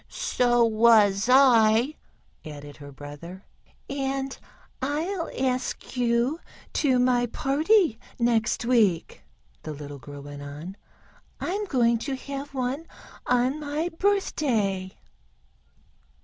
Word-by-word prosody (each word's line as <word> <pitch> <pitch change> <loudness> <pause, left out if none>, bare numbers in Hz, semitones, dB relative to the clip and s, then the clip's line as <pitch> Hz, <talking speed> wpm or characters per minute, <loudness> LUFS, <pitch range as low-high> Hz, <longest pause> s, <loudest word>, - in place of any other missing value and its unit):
"So 240 -1 +2
was 215 -2 +4
I," 245 -1 +5 0.5
added 145 -2 -9
her 145 -1 -11
brother. 145 +7 -10 0.4
"And 270 -1 -2 0.5
I'll 325 +7 -2
ask 255 0 -2
you 245 +5 +1 0.3
to 265 -5 +2
my 245 -1 +2
party 305 - +2 0.2
next 235 -1 +1
week," 215 -9 +2 0.4
the 155 - -6
little 145 -1 -8
girl 140 +3 -10
went 145 0 -9
on. 150 +6 -8 0.6
"I'm 405 +4 -2
going 235 - +2
to 275 +3 -3
have 275 +1 -7
one 265 +5 -2 0.4
on 250 +4 +2
my 300 +3 -2
birthday." 255 - 0
245 Hz, 105 wpm, -26 LUFS, 195-275 Hz, 0.6 s, I